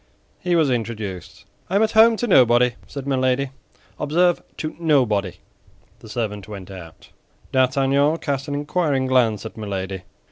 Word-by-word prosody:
He 180 -1 0
was 155 -5 +3
introduced. 110 -6 -5 0.2
"I 190 - -2
am 205 - +4
at 220 - +1
home 225 +1 +6
to 240 - -1
nobody," 125 - +5 0.2
said 140 -2 -7
Milady; 130 0 0 0.5
"observe, 175 +4 +2 0.2
to 155 - -5
nobody." 120 - +2 0.7
The 110 - -13
servant 105 -3 -4
went 100 -3 -9
out. 85 -4 -12 0.4
D'Artagnan 135 +3 +2
cast 140 -3 -3
an 145 - -3
inquiring 145 -2 0
glance 120 -5 +2
at 110 - -8
Milady. 95 -3 -4
130 Hz, 145 wpm, -22 LUFS, 110-150 Hz, 0.7 s, home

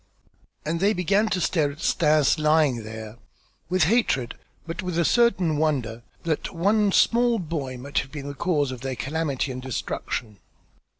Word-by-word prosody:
And 165 +2 -1
they 200 +4 +3
began 200 +3 +2
to 185 - 0
stare 155 -5 +1
at 145 - -13
Stas 155 -3 +3
lying 150 -5 +3
there, 110 +1 -8 0.5
with 185 -1 +3
hatred 160 - +1 0.3
but 165 +2 -5
with 180 -2 -3
a 170 - +2
certain 190 -10 +3
wonder 130 -7 -1 0.2
that 160 -2 -2
one 205 +4 +2
small 235 +3 +3
boy 150 -8 -4
might 140 +3 -2
have 135 - -6
been 145 -2 -7
the 145 - -5
cause 145 -3 0
of 125 -2 -7
their 130 0 -3
calamity 145 -1 -2
and 130 0 -6
destruction. 115 -4 -4
155 Hz, 165 wpm, -24 LUFS, 135-180 Hz, 0.5 s, they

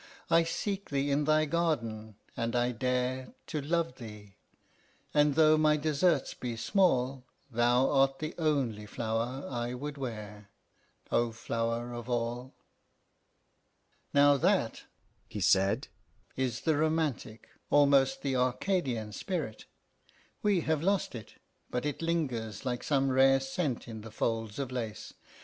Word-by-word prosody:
I 165 0 +5
seek 200 +4 -3
thee 140 0 0
in 145 +1 +2
thy 155 +1 +3
garden, 120 -10 -1 0.2
and 115 +1 -2
I 120 0 +2
dare 125 +1 -2
To 150 - -3
love 160 -2 -1
thee; 105 -5 -11 0.8
and 150 -1 +4
though 155 0 +5
my 155 -1 +4
deserts 150 0 +1
be 120 -2 -5
small, 130 - +1 0.3
Thou 120 +3 +3
art 135 -1 +3
the 155 +2 -4
only 130 -10 0
flower 115 +5 -3
I 120 -1 -3
would 145 +2 -6
wear, 105 -5 -6 0.6
O 120 0 +2
flower 115 +1 -2
of 120 +1 -7
all!" 120 +2 -2 1.6
"Now 145 0 +5
that," 170 - +1 0.4
he 105 - -6
said, 100 - +3 0.5
"is 125 -3 -1
the 160 -2 +2
romantic, 155 -8 -1 0.2
almost 140 -2 +4
the 135 -2 0
Arcadian 125 - 0
spirit. 155 - -4 0.8
We 200 -4 +2
have 160 -2 0
lost 195 +3 +1
it, 115 -4 -9 0.3
but 125 +2 -2
it 150 +1 -3
lingers 130 - -2
like 125 -1 -1
some 135 -2 +1
rare 135 +1 +5
scent 135 -1 -2
in 110 -2 -7
the 110 - -9
folds 115 -1 -2
of 135 -2 -3
lace. 115 -4 -5
130 Hz, 135 wpm, -30 LUFS, 115-150 Hz, 1.6 s, I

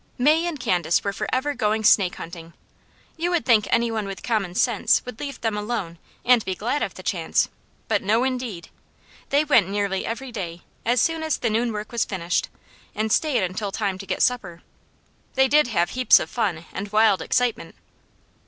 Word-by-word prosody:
May 310 +6 +3
and 320 -5 -4
Candace 175 -7 +1
were 200 - -2
forever 265 +7 -1
going 220 -3 0
snake 195 -4 +4
hunting. 165 0 -9 0.6
You 340 +2 -1
would 350 -2 0
think 225 -4 +4
any 235 0 +2
one 215 -2 -2
with 195 -1 -7
common 205 -7 -1
sense 230 -1 +2
would 250 -3 -8
leave 280 -1 -6
them 225 -2 -1
alone 210 -6 -4 0.3
and 245 -3 +5
be 190 - -3
glad 240 +10 -2
of - - -3
the - - -10
chance, - - 0 0.4
but - - +1
no 220 +5 +2
indeed! 250 -9 -3 0.6
They 285 +2 +3
went 220 - +4
nearly 200 -1 -1
every 250 +3 -5
day 175 -6 -6 0.2
as 240 +1 +3
soon 325 +5 +1
as 315 -1 0
the 230 - -1
noon 230 +2 +1
work 210 0 -6
was 235 -2 +1
finished, 180 -2 -2 0.5
and 215 +1 -1
stayed 290 -7 +2
until 190 +3 -3
time 195 -3 -2
to 195 - -9
get - - 0
supper. 190 -9 -1 0.7
They 265 0 +4
did 300 0 +4
have 175 -7 0
heaps 255 0 +5
of - - -5
fun 180 -9 -1
and 200 +1 -5
wild 215 -2 +4
excitement. 250 -2 -1
220 Hz, 190 wpm, -23 LUFS, 195-250 Hz, 0.7 s, and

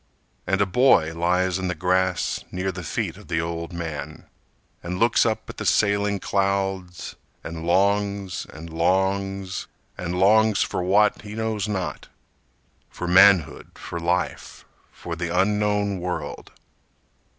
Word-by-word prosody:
And 95 0 +1
a - - +4
boy 90 -6 +4
lies 90 +2 +1
in 95 - -2
the 90 - -2
grass 90 +1 0
Near 95 +1 -2
the 90 0 -7
feet 80 - -3
of - - -14
the 80 -2 -1
old 85 +1 -4
man, 80 -4 -6 0.6
And 90 +1 -4
looks 115 +2 +3
up 110 - -2
at - - -9
the - - -4
sailing 100 -1 +2
clouds, 95 -2 -2 0.3
And 80 0 -6
longs, 100 0 +1
and 80 +2 -10
longs, 95 +2 0 0.3
and 90 0 -3
longs 110 +2 +4
For - - -3
what, 100 +4 +3
he 105 0 -9
knows 110 -2 -2
not: 95 -4 -4 0.8
For 90 - -6
manhood, 95 -2 +4
for 85 - -6
life, 90 +2 -2 0.3
for 85 - -7
the 85 +1 -3
unknown 105 0 +1
world! 90 0 -5
95 Hz, 140 wpm, -24 LUFS, 85-100 Hz, 0.8 s, a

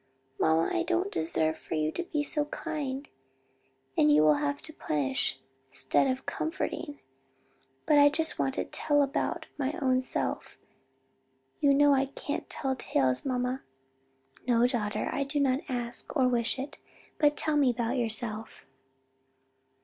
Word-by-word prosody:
"Mamma 160 +1 +3
I 345 - +1
don't 355 +3 0
deserve 160 0 0
for - - -5
you 155 0 0
to - - -3
be 305 -4 -2
so 295 0 0
kind, 290 -3 -4 0.9
and 150 - +5
you'll 150 +1 +6
have 145 -1 -1
to 315 - -5
punish, 135 - -1 0.3
'stead 130 - +1
of 260 0 -2
comforting. 315 -1 -3 0.9
But 295 -1 +5
I 290 0 +8
just 320 +2 0
want 270 0 0
to - - -1
tell 290 -1 +2
about 275 - -2
my 275 +1 0
own 255 -3 +2
self; 260 - -3 1.0
you 285 -3 +4
know 290 0 +6
I 270 0 +2
can't 285 +2 -5
tell 270 -2 -2
tales, 130 - 0
mamma." 250 0 -1 0.9
"No, 240 -1 +4
daughter, 225 -5 -1
I 280 - 0
do 285 +2 -2
not 270 -2 +2
ask, 245 +3 -4
or 260 -2 +4
wish 235 -1 0
it; 270 +2 -6 0.4
but 295 -1 +4
tell 310 -1 0
me 285 -3 +4
about 240 +1 -1
yourself." 225 -2 -3
260 Hz, 150 wpm, -29 LUFS, 220-290 Hz, 1.0 s, I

